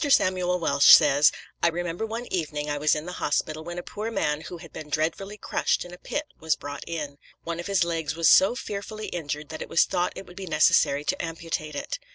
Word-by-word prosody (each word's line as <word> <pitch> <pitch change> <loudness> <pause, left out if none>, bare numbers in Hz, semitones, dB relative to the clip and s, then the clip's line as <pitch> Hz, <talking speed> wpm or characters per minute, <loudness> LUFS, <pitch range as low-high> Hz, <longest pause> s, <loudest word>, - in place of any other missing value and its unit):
Samuel 185 -8 +3
Welsh 140 -5 +7
says: 145 +2 +5 0.3
"I - - +4
remember 175 +4 -2
one 230 +2 -5
evening 150 -4 -2
I 145 - -2
was 150 +1 +3
in 150 +1 -4
the 180 - -5
hospital 155 +1 -1
when 175 +1 -7
a 175 - -4
poor 215 +2 -5
man 150 -9 -1
who 175 - -8
had - - -13
been 150 - -8
dreadfully 165 +7 -2
crushed - - -1
in 175 - -11
a 180 - -11
pit 295 - -3 0.2
was 160 -1 +1
brought 145 0 -7
in. 150 -4 -5 0.2
One 170 0 -4
of 175 - -5
his 195 -2 +2
legs 165 -3 -2
was 165 0 +2
so 195 +6 +6
fearfully 215 -1 -6
injured 150 -3 -4
that 160 - -7
it - - -6
was - - +5
thought 175 - -1
it - - -8
would 175 +1 -15
be 190 -1 -6
necessary 150 -2 +3
to - - -1
amputate 165 -2 -4
it. - - -4
165 Hz, 225 wpm, -26 LUFS, 150-180 Hz, 0.3 s, Welsh